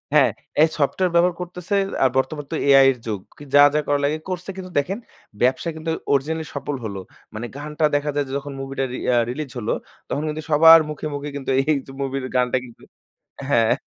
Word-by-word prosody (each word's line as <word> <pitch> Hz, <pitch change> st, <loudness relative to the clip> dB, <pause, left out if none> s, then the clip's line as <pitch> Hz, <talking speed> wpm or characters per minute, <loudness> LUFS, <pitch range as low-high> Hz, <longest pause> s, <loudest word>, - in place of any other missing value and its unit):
হ্যাঁ, -, -, +5 dB, 0.3 s
এই -, -, +6 dB
সফটওয়্যার 175 Hz, +5 st, +1 dB
ব্যবহার 175 Hz, 0 st, +4 dB
করতেছে 180 Hz, +2 st, -4 dB, 0.3 s
আর 130 Hz, -, +5 dB
বর্তমান 145 Hz, +2 st, -1 dB
তো -, -, -1 dB
AI 135 Hz, -1 st, +8 dB
এর -, -, -15 dB
যুগ। 105 Hz, -3 st, -2 dB, 0.2 s
কি -, -, -11 dB
যা, 145 Hz, -, +9 dB
যা -, -, +4 dB
করা 145 Hz, 0 st, +2 dB
লাগে, 150 Hz, +2 st, 0 dB
করছে। 180 Hz, 0 st, -4 dB
কিন্তু 185 Hz, -1 st, -7 dB
দেখেন, 190 Hz, +10 st, -3 dB, 0.4 s
ব্যবসা 130 Hz, +7 st, +2 dB
কিন্তু 160 Hz, +1 st, -3 dB, 0.2 s
অরিজিনালি 155 Hz, +4 st, 0 dB
সফল 140 Hz, 0 st, -3 dB
হলো। 100 Hz, -2 st, -4 dB, 0.4 s
মানে 110 Hz, +2 st, -4 dB
গানটা 150 Hz, +2 st, -1 dB
দেখা 145 Hz, +1 st, 0 dB
যায় 145 Hz, -1 st, +1 dB
যে -, -, -6 dB
যখন 140 Hz, 0 st, -7 dB
মুভিটা 135 Hz, 0 st, -3 dB
রি -, -, -3 dB, 0.2 s
আ -, -, +4 dB
রিলিজ 140 Hz, +1 st, -5 dB
হলো, 105 Hz, -, -1 dB, 0.4 s
তখন 145 Hz, -, -2 dB
কিন্তু 155 Hz, +1 st, -4 dB
সবার 165 Hz, +2 st, +9 dB
মুখে, 150 Hz, 0 st, -5 dB
মুখে 145 Hz, +1 st, -5 dB
কিন্তু 135 Hz, -1 st, -3 dB
এইযে 140 Hz, -2 st, -1 dB
মুভির 135 Hz, -1 st, -2 dB
গানটা 125 Hz, 0 st, +2 dB
কিন্তু 120 Hz, -2 st, -16 dB, 0.7 s
হ্যাঁ। 115 Hz, -4 st, +4 dB
145 Hz, 200 wpm, -22 LUFS, 135-160 Hz, 0.7 s, যা